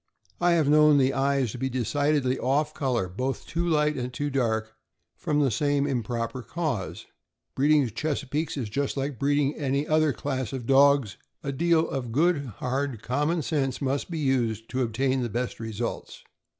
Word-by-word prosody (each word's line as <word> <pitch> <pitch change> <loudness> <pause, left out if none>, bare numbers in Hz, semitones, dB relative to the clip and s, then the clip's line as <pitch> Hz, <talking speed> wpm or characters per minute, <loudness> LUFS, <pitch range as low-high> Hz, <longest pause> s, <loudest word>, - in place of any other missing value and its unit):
I 175 0 +3
have 160 -4 +2
known 150 0 +6
the 135 -1 +3
eyes 135 -3 +1
to 125 - -8
be 130 - -1
decidedly 135 +1 0
off 145 +4 +1
color, 125 -10 -1
both 130 +9 -3
too 170 +2 -2
light 150 -2 +2
and 125 0 -3
too 145 +3 -3
dark, 110 -4 0 0.4
from 150 -3 -1
the 135 -3 +2
same 145 +4 +1
improper 120 -1 -2
cause. 145 - -3 0.5
Breeding 145 0 +3
Chesa 140 +4 -3
peakes 150 +4 -2
is 125 -5 -2
just 140 +6 -2
like 135 -2 -3
breeding 145 0 +2
any 140 0 -1
other 155 -1 +3
class 130 -4 -3
of 130 -3 -4
dogs, 135 -4 +4 0.3
a 140 - -2
deal 165 +3 +2
of 125 -4 -4
good, 150 +2 +2
hard 130 -2 -2
common 150 +6 0
sense 135 -3 -1
must 140 +2 -1
be 170 - -4
used 120 -6 0
to 130 - -1
obtain 130 +3 0
the 120 - -2
best 120 +3 -3
results. 115 +1 -5
135 Hz, 175 wpm, -26 LUFS, 125-150 Hz, 0.5 s, known